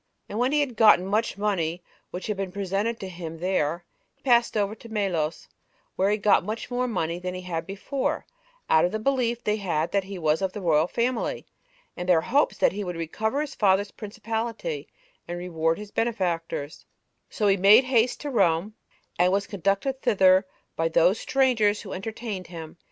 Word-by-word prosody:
And 210 - -4
when 250 +2 +2
he 295 0 +3
had 265 -5 -2
gotten 210 -5 +6
much 210 +2 0
money 180 -5 -1 0.3
which 180 - -6
had 210 - -2
been 195 -1 -4
presented 200 +4 -2
to 190 - -4
him 170 -3 -7
there, 175 -1 -1 0.3
he - - -40
passed 240 -3 +3
over 205 0 0
to 225 +1 -13
Melos, 180 -7 -2 0.5
where 190 +1 +2
he 210 - +2
got 210 -1 +3
much 215 +5 -5
more 250 +1 0
money 175 -6 -2
than 180 0 -4
he 185 - -5
had 165 -3 -4
before, 255 +8 -3 0.4
out 160 - +4
of 175 - +2
the 215 - -1
belief 240 0 0
they 210 0 +1
had 170 -5 -1
that 200 -2 +1
he 195 0 -7
was 160 0 +1
of 190 -1 -1
the - - -5
royal 160 -3 +2
family, 235 +4 -1 0.5
and 180 +1 -5
their 170 -3 +5
hopes 285 - +1
that - - +3
he 205 +2 -4
would 180 -2 -4
recover 220 - -2
his 300 - -4
father's 200 0 +2
principality, 225 - -4 0.4
and 175 - -4
reward 165 -2 -1
his 210 -1 -9
benefactors; 175 -9 -2 0.5
so 210 - -2
he 195 -1 +5
made 200 +6 +7
haste 250 -2 +2
to 290 - -4
Rome, 190 -3 +2 0.5
and 180 +1 +4
was 200 +1 +1
conducted 200 +8 -1
thither 190 -1 +4 0.3
by 165 - +1
those 175 +5 +3
strangers 235 -6 +2
who 195 - -7
entertained 210 -1 -5
him. 165 -2 -9
200 Hz, 190 wpm, -26 LUFS, 180-225 Hz, 0.5 s, made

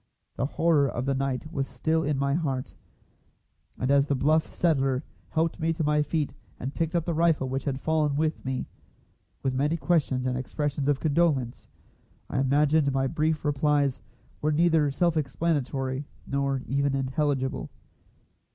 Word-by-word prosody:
The 135 - -1
horror 155 -3 +2
of 120 - -3
the 135 - +1
night 135 +2 -2
was 140 -4 -2
still 160 0 0
in 150 -2 0
my 140 0 +1
heart, 135 -5 -2 1.0
and 130 - 0
as 140 0 +4
the 140 - +1
bluff 155 +4 +2
settler 135 -5 +1 0.3
helped 165 +1 0
me 165 0 +1
to 160 - -2
my 150 0 +3
feet 150 -2 -1 0.3
and 135 +3 -4
picked 165 +1 -1
up 170 -2 +1
the 170 - -1
rifle 160 -4 +2
which 130 +1 -3
had 135 -2 -1
fallen 155 -1 +1
with 155 +1 0
me, 130 -1 -2 0.8
with 130 - 0
many 145 +5 +1
questions 150 -7 +1
and 130 -1 0
expressions 145 +1 -2
of 140 -2 +2
condolence, 145 -6 +1 0.6
I - - 0
imagine 145 +2 +3
my 135 0 +1
brief 155 +1 0
replies 145 -1 +1 0.4
were 155 - +1
neither 160 -1 +3
self 165 +4 +1
explanatory 135 -2 -1 0.2
nor 140 -1 -1
even 140 0 0
intelligible. 135 0 -1
145 Hz, 160 wpm, -27 LUFS, 135-160 Hz, 1.0 s, as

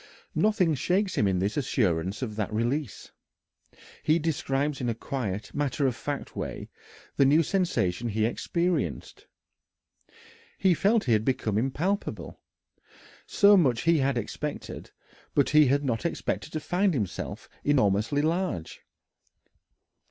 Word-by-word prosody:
Nothing 210 -6 +2
shakes 185 +7 0
him 105 - +2
in 95 -2 +1
his 100 +7 -1
assurance 95 - 0
of 110 -4 -4
that 105 -1 -2
release. 120 +3 -2 0.9
He 155 +1 +3
describes 145 -3 -1
in 120 - -1
a 115 - -1
quiet, 110 -5 -4
matter 145 0 0
of 130 -3 +1
fact 145 +2 -5
way - - -5 0.5
the - - +5
new 150 +5 +5
sensation 120 - 0
he 110 0 0
experienced. 150 - -2 1.3
He 190 -2 +4
felt 205 +6 +2
he 120 - +2
had 110 0 +2
become 110 -4 -1
impalpable 145 - -2 0.9
so 205 0 +6
much 130 - +3
he 165 -1 +4
had 135 -1 +1
expected, 145 +6 -5 0.5
but 140 - +3
he 150 -1 +6
had 140 +2 +1
not 115 -4 -1
expected 170 -2 -3
to 155 - -1
find 180 +2 +1
himself 105 -8 -4 0.2
enormously 125 0 +2
large. 160 - -2
140 Hz, 130 wpm, -27 LUFS, 110-165 Hz, 1.3 s, so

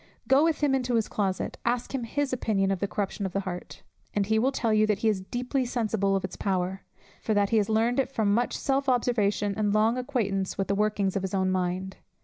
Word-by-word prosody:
Go 270 +3 +5
with 325 -2 +1
him 285 -2 +3
into 250 -2 0
his 225 -2 +1
closet, 190 -3 -2
ask 240 +2 -1
him 255 -3 -2
his 280 +3 -1
opinion 200 -5 +1
of 195 - -1
the 200 - -1
corruption 200 +2 -3
of 185 - -10
the 195 - 0
heart, 180 -2 -7 0.3
and 205 -1 +2
he 220 +2 +2
will 260 +4 +2
tell 230 -4 0
you 215 0 +4
that 210 -2 +2
he - - +5
is 200 -3 0
deeply 250 +6 -2
sensible 220 -5 0
of 195 - -1
its 185 - -7
power, 190 -1 -1 0.4
for 215 - 0
that 200 -1 +2
he 225 - +4
has 210 -1 +1
learned 230 +4 +2
it 270 - +1
from 215 -6 +1
much 240 +3 0
self 275 0 0
observation 210 -5 +1
and 210 0 +1
long 225 +4 +3
acquaintance 210 -8 -1
with 195 - -2
the - - +2
workings 205 -1 0
of 195 - 0
his 190 +1 -3
own 190 -1 +1
mind. 185 +1 -2
215 Hz, 240 wpm, -27 LUFS, 195-245 Hz, 0.4 s, Go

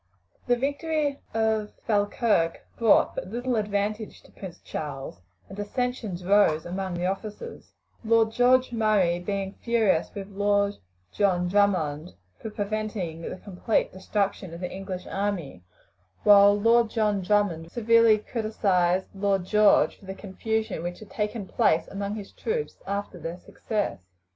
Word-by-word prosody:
The 245 - +4
victory 285 +2 -1
of 220 -1 0
Falkirk 205 -5 +1
brought 230 -3 +4
but - - -5
little 245 +4 -2
advantage 210 0 -2
to - - -19
Prince 190 -4 -9
Charles, 135 - -6 0.3
and 195 - -10
dissensions 205 -3 -3
arose 180 -5 +3
among 185 +1 -3
the 175 +1 -2
officers; 210 - -5 0.3
Lord 225 0 +3
George 250 +2 +3
Murray 210 -7 +2
being 195 +1 -3
furious 225 -8 +2
with 200 -1 -6
Lord 200 0 +1 0.4
John 180 -3 +2
Drummond 175 -5 +1 0.2
for 220 - -6
preventing 205 -5 -3
the - - -5
complete 200 +3 -1
destruction 190 -2 -2
of 170 - -9
the 180 - -4
English 190 -1 -6
army, 190 - -3 0.6
while 205 0 +7
Lord 230 +1 +4
John 210 -3 +1
Drummond 180 -4 0
severely 230 -1 +5
criticised 195 -5 0
Lord 195 -2 0
George 210 +1 +4
for 200 - -16
the 190 0 -6
confusion 220 0 -3
which 175 +1 -4
had 215 - -13
taken 210 -1 -3
place 165 -3 +2
among 200 +1 -4
his 205 -2 -8
troops 455 0 -3
after 200 -2 -4
their 165 +2 -5
success. 205 - -3
205 Hz, 140 wpm, -26 LUFS, 185-220 Hz, 0.6 s, while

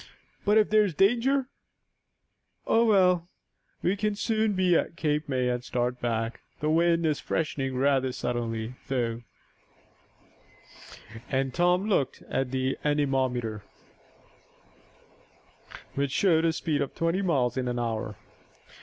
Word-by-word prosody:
"But 210 +1 +4
if 215 -1 +3
there's 210 -6 +3
danger 245 - +3 0.6
" - - -49
"Oh, 230 +1 +3
well, 180 -5 +3 0.5
we 185 - +2
can 210 0 -1
soon 220 0 0
be 185 -2 +3
at 165 - 0
Cape 150 -2 -1
May, 130 -2 0
and 125 0 -1
start 125 0 -2
back. 115 -1 -2 0.2
The 150 +1 0
wind 170 +1 +3
is 155 -2 +1
freshening 135 -4 -2
rather 135 -1 +2
suddenly, 120 -2 -3
though," 120 -3 -1 2.1
and 135 -1 0
Tom 180 +4 +2
looked 150 -11 0
at 135 -1 -1
the 130 +1 -1
anemometer, 130 -7 0 2.3
which 140 0 -1
showed 165 +2 +3
a 165 - +3
speed 160 -2 -1
of 140 - -3
twenty 165 +3 0
miles 135 - +1
an 125 -2 -2
hour. 110 -3 -3
145 Hz, 125 wpm, -27 LUFS, 125-180 Hz, 2.3 s, But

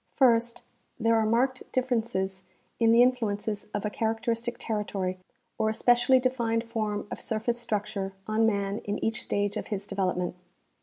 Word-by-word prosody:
First, 240 -2 +3 0.4
there 230 0 +3
are 220 -1 +3
marked 260 +4 +2
differences 220 -7 -1 0.4
in 230 -1 +5
the 235 +1 +7
influences 215 -4 0
of 205 - -3
a 210 - -1
characteristic 230 +2 -1
territory 200 -4 -2 0.4
or 220 0 +2
a 220 - -2
specially 245 +2 +5
defined 235 -3 0
form 215 -3 -2
of - - -5
surface 230 +2 -1
structure 210 -4 -2
on 220 +2 +2
man 200 -1 0
in 205 0 -3
each 225 +1 -1
stage 205 0 -1
of - - -4
his 200 -2 -3
development. 185 -3 -1
225 Hz, 155 wpm, -28 LUFS, 205-235 Hz, 0.4 s, the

